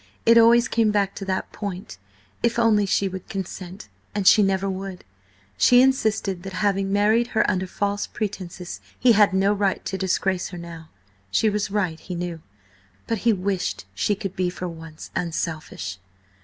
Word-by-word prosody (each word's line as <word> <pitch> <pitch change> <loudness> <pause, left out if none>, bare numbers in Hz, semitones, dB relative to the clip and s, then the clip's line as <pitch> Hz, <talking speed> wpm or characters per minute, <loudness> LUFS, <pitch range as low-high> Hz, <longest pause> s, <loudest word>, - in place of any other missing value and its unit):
It 230 - +7
always 235 +1 +6
came 225 -3 +2
back 200 -2 +1
to 195 - -7
that 190 -1 -2
point: 190 - -6 0.4
if 235 0 +1
only 215 -3 +3
she 195 +1 +1
would 190 -1 -7
consent. 190 -1 -6 0.3
And 205 -2 -1
she 215 +2 +7
never 195 0 +1
would. 190 -1 -5 0.6
She 245 - +7
insisted 220 -8 +1
that, 190 0 -8
having 195 0 0
married 215 +4 +3
her - - +4
under 190 -2 0
false 205 +2 -2
pretences, 190 -4 -5 0.2
he 250 - +5
had 210 -2 +5
no 195 +2 +3
right 200 -1 0
to 190 - -3
disgrace 190 -1 0
her 180 - -8
now. 165 -2 -9 0.4
She 215 - +2
was 210 0 -1
right, 185 -6 -1
he 180 - -7
knew, 170 -2 -4 0.6
but 225 -2 -1
he 230 +3 +3
wished 190 - -2
she 205 - 0
could 195 -1 -6
be 180 -1 0
for 180 0 -5
once 165 -2 -10
unselfish. 155 - -4
195 Hz, 170 wpm, -24 LUFS, 180-210 Hz, 0.6 s, It